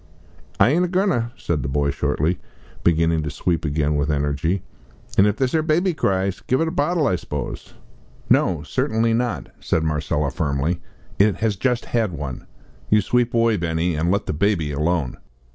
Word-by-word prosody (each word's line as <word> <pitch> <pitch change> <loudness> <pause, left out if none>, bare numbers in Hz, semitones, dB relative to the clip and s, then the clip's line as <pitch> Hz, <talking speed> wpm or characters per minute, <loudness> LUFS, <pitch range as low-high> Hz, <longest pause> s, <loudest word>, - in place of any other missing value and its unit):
"I - - +6
aint 170 +4 +3
a - - +1
goin' 190 +3 +1
ter," 120 -7 0
said 80 -4 -1
the 65 - -3
boy, 70 +1 +1
shortly, 80 +6 0 0.4
beginning 80 -1 +3
to 75 - -3
sweep 85 +3 -1
again 75 0 0
with 75 +1 0
energy, 75 +5 0 0.5
"an' 100 - +5
if 105 - +1
this 130 0 0
'ere 160 - +3
baby 170 +4 +2
cries, 95 - 0
give 130 - 0
it 165 - +2
the 160 - -2
bottle, 165 0 +1
I 95 - +2
s'pose?" - - -6 0.5
"No, 85 -5 +3
certainly 110 +10 0
not," 115 - -1
said 80 - 0
Marcella, 75 -2 0
firmly; 75 +1 -1 0.4
"it 100 -1 +4
has 110 0 0
just 125 +4 0
had 110 -6 0
one. 70 -4 -6 0.4
You 105 - +5
sweep 120 +4 +1
away, 115 -2 +3
Benny, 85 0 0
and 80 +2 0
let 100 +2 +1
the - - -2
baby 80 -2 +1
alone." 75 -1 -1
90 Hz, 180 wpm, -22 LUFS, 75-115 Hz, 0.5 s, I